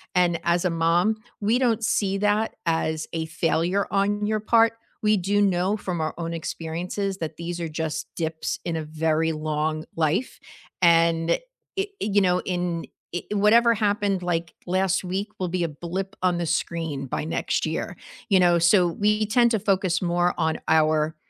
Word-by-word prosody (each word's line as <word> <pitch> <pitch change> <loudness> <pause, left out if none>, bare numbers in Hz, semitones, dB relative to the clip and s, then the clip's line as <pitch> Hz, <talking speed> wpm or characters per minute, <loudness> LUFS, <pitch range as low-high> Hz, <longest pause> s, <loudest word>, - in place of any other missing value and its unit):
and 175 -2 +3
as 170 +1 +1
a - - +3
mom, 170 +6 +2 0.2
we 215 +4 +2
don't 235 -3 +1
see 195 -2 +1
that 210 +2 +1
as 160 -1 0
a 165 -1 -2
failure 170 +4 0
on 205 +1 +1
your 215 +1 0
part. 225 +1 +4 0.3
We 215 -1 +3
do 200 +3 +1
know 190 0 +2
from 185 -5 -4
our 155 0 -1
own 165 -1 -4
experiences 175 +4 -3
that 160 -3 -5
these 170 +2 -5
are 170 - -2
just 160 0 -3
dips 160 -1 -2
in 170 -2 -2
a 160 - -3
very 160 +1 0
long 155 0 -2
life, 165 - 0 0.4
and 165 -1 +4
it - - +1 0.3
it 390 +1 -1
you 205 -1 +2
know, 180 -1 +3
in 175 -2 -2 0.3
it 175 - -4
whatever 230 +3 +5
happened, 205 -3 0
like, 170 -1 -2
last 190 +1 +1
week 190 +3 -2
will 185 - -1
be 180 0 -1
a - - +1
blip 180 +6 -5
on 180 -1 +2
the 170 - -2
screen 160 -4 -2
by 130 - -3
next 160 - -1
year. - - -3 0.3
You 195 -3 +5
know, 175 -1 +5
so 175 +2 +5
we 210 +4 +1
tend 235 +2 +4
to 220 - +2
focus 190 -3 +1
more 175 0 +1
on 160 -1 0
our 155 0 +3
175 Hz, 175 wpm, -24 LUFS, 165-200 Hz, 0.4 s, whatever